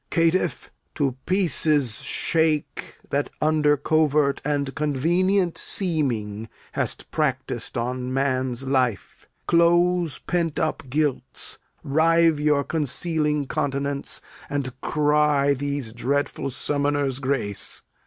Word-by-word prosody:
Caitiff, 165 +2 +1 0.3
in 135 -3 +1
pieces 155 - +2
shake 160 -2 0 0.2
That 140 +1 0
under 150 -1 +3
covert 150 -1 +2
and 140 -1 -1
convenient 175 +6 +1
seeming 115 - -1 0.2
Hast - - -2
practis'd 130 -5 -2
on 125 +2 -2
man's 130 -1 0
life. 130 -6 -1 0.2
Close 175 -1 +3
pent 170 -3 -2
up 160 -2 -1
guilts, 145 0 -1 0.2
Rive 165 +2 +3
your 150 -1 +2
concealing 150 -1 0
continents, 140 -1 -2 0.3
and 140 -2 -2
cry 150 -1 +2
These 140 -4 -3
dreadful 140 +3 -1
summoners 145 0 -1
grace. 130 -7 -2
145 Hz, 95 wpm, -24 LUFS, 135-160 Hz, 0.3 s, under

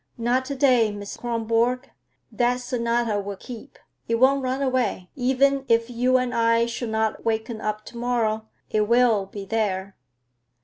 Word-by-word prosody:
"Not 245 +2 +1
to 280 - -4
day, 250 -5 +4
Miss 205 -1 -7
Kronborg. 235 +2 0 0.4
That 245 0 +1
sonata 235 -3 0
will 200 0 -5
keep; 235 +1 -10 0.3
it 230 - +1
won't 265 +3 +4
run 260 +1 -1
away. 250 -9 -1
Even 270 +1 +2
if 230 +1 +2
you 250 +2 +2
and 250 -1 -1
I 230 0 +3
should 235 0 -4
not 220 0 -1
waken 220 0 -2
up 215 0 -3
to 235 - -10
morrow, 225 -3 0 0.2
it 210 -1 +1
will 235 -4 +3
be 195 0 -8
there." 195 -2 -2
235 Hz, 160 wpm, -24 LUFS, 220-250 Hz, 0.4 s, day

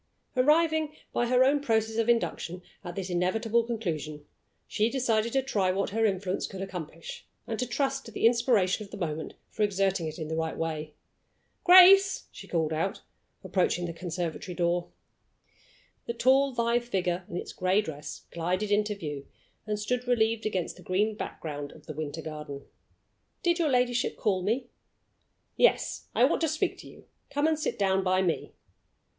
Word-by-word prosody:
Arriving, 310 +3 +3 0.2
by 240 - +1
her 250 +1 +5
own 280 +2 +4
process 225 -4 +1
of 230 0 +1
induction, 185 -6 0 0.2
at 175 0 -7
this 190 -1 -4
inevitable 220 +6 +1
conclusion, 160 -10 -4 0.4
she 215 +2 +1
decided 235 -3 +1
to 270 +1 +1
try 205 -8 +1
what 195 +1 0
her 225 +1 +2
influence 190 -1 -1
could 190 - -8
accomplish, 165 -4 -7 0.2
and 225 - -4
to 250 - -1
trust 270 +2 -1
to 225 - -10
the 225 - -1
inspiration 230 -5 +3
of 200 - -12
the - - -8
moment 160 -4 -4 0.2
for - - -5
exerting 195 -4 +1
it 155 - -6
in 160 -3 -4
the 160 - -3
right 160 0 -2
way. 155 -2 -3 0.7
"Grace!" 385 +1 +8
she - - -11
called 160 -2 0
out, 165 +5 -2 0.4
approaching 175 -2 +1
the 170 - -4
conservatory 175 0 -4
door. 175 0 0 1.2
The 235 - -3
tall, 265 +2 +3
lithe 235 +1 +1
figure 180 -5 -1
in 175 - -4
its - - -6
gray 185 +2 +2
dress 150 -7 -6
glided 185 +5 -1
into 210 0 +2
view, 150 -7 -6 0.4
and 210 0 -1
stood 250 +4 -2
relieved 225 -2 +2
against 185 -6 -2
the - - -13
green 195 +5 +1
background 145 -7 -6
of - - -16
the 155 - -6
winter 155 +1 -5
garden. 150 -3 -7 0.8
"Did 345 0 +2
your 325 -3 +2
ladyship 250 -1 +1
call 195 -5 +1
me?" 230 +7 0 0.9
"Yes; - - +2
I - - +4
want - - +1
to 325 - +3
speak 315 +5 -1
to - - -11
you. - - -15 0.2
Come 290 +1 0
and 315 -1 +2
sit - - -2
down 190 -1 +2
by 185 0 +2
me." 170 -3 -1
205 Hz, 175 wpm, -28 LUFS, 175-240 Hz, 1.2 s, Grace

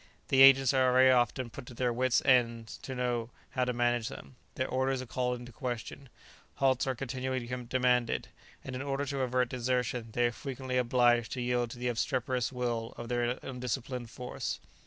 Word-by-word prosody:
The 135 - +5
agents 135 -1 +8
are 130 -1 +4
very 130 +1 +6
often 120 0 +1
put 120 - -9
to 125 - -10
their 125 0 0
wits' 125 +1 +2
end 115 -3 +3 0.2
to 130 - -6
know 120 -2 -1 0.2
how 130 -1 0
to 125 - 0
manage 120 -1 +1
them; 135 - -9 0.2
their 130 - -1
orders 130 +1 0
are 130 - -5
called 125 0 -2
in 120 - -9
question, 120 +3 -5 0.5
halts 135 -1 +2
are 130 - 0
continually 130 0 -3 0.2
demanded, 125 -1 +1 0.3
and 130 - -6
in 130 - -4
order 140 0 -2
to 140 0 -3
avert 125 -1 +1
desertion 125 -2 -1
they 120 +1 +2
are 120 - +2
frequently 130 0 -4
obliged 120 -1 +3
to 125 - -3
yield 120 -1 0
to 120 - -9
the 125 +1 -2
obstreperous 125 0 -1
will 120 -3 -3
of 120 - -7
their 120 0 0
undisciplined 125 -1 -4
force. 125 +2 -5
125 Hz, 185 wpm, -31 LUFS, 120-130 Hz, 0.5 s, agents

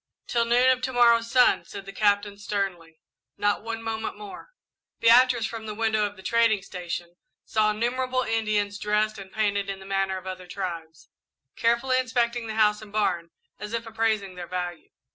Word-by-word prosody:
"Till 235 -1 +1
noon 245 +2 +4
of 255 0 0
to 260 - -2
morrow's 235 -1 +4
sun," 250 +1 +4
said 200 -1 -9
the 195 - -9
Captain, 205 -1 +1
sternly; 195 -5 -4 0.4
"not 205 0 +1
one 225 +1 -5
moment 225 -1 -4
more." 210 - -10 0.5
Beatrice, 240 0 +5
from 220 -1 -6
the 210 - -5
window 220 -1 +1
of 205 - -11
the 190 - -14
trading 230 -3 +2
station, 175 -2 -6 0.3
saw 215 -1 +2
innumerable 255 +4 0
Indians, 215 -3 0
dressed 210 0 0
and 190 -1 -10
painted 200 -1 0
in 195 -1 -4
the 190 - -12
manner 195 -1 0
of 185 - -10
other 185 -1 -7
tribes, 170 -4 -6 0.5
carefully 235 +3 +2
inspecting 240 -1 0
the 220 - -5
house 210 -1 +3
and 215 -1 -12
barn 180 -5 0 0.3
as 210 - -7
if 230 0 -2
appraising 220 -3 -1
their 180 -1 -8
value. 180 -2 -5
215 Hz, 180 wpm, -26 LUFS, 195-230 Hz, 0.5 s, Beatrice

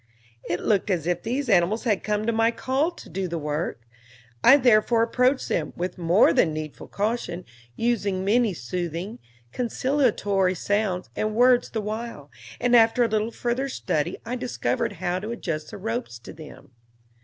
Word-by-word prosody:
It 175 +1 -1
looked 210 -1 +1
as 175 -5 0
if 175 0 0
these 255 +4 -2
animals 200 +1 +2
had 215 -6 +1
come 210 0 -1
at 230 - +2
my 225 +1 +3
call 265 +6 0
to 345 - -13
do 185 +2 -3
the 170 -1 -3
work; 150 -5 -3 0.6
I 270 - +8
therefore 235 -2 +4
approached 250 +3 +1
them, 155 - -2
with 180 +1 -4
more 175 +4 +4
than 160 - +3
needful 155 -1 -6
caution, 200 -4 -2 0.3
using 205 -5 0
many 220 -1 +2
soothing, 175 - -4 0.3
conciliatory 230 -7 +1
sounds 200 -1 -1
and 215 0 -1
words 245 +1 +4
the 220 - -3
while, 215 -8 -6 0.3
and 245 0 +3
after 230 +1 +5
a - - +3
little 215 0 0
further 240 +3 -2
study 165 - -2
I 240 +2 -3
discovered 245 -2 -2
how 180 0 -2
to 210 +3 -6
adjust 165 -10 -4
the 215 - -8
ropes 225 - -4
to 115 - -11
them. 155 -5 -13
210 Hz, 165 wpm, -25 LUFS, 175-235 Hz, 0.6 s, I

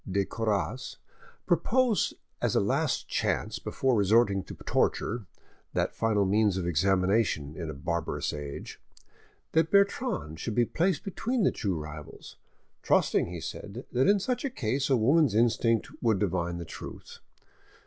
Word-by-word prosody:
de 100 +1 +1
Coras, 115 +4 -2 0.5
proposed 220 +7 +2 0.3
as - - +1
a - - +5
last - - 0
chance - - -1
before 130 -2 0
resorting 100 -1 +3
to - - -10
torture, 110 -2 0 0.5
that - - 0
final 105 -3 +1
means 105 0 +2
of 90 - -2
examination 90 -2 +1
in 85 -3 -5
a - - -4
barbarous 85 +4 -2
age, 75 -1 -7 0.7
that 160 0 +3
Bertrande 200 - +1
should 110 +4 -3
be 120 - +4
placed 175 - 0
between 225 +4 -1
the - - +4
two 100 -5 -2
rivals, 75 -1 -9 0.5
trusting, - - +2
he 85 0 -6
said, 105 +8 -7
that 125 +5 +2
in 200 0 +5
such 250 +8 -2
a 275 - 0
case 135 - -1
a 135 - +4
woman's 135 +1 +3
instinct 115 -1 +2
would 115 -4 +3
divine 85 -3 -1
the 85 - -6
truth. - - -9
110 Hz, 150 wpm, -28 LUFS, 90-135 Hz, 0.7 s, a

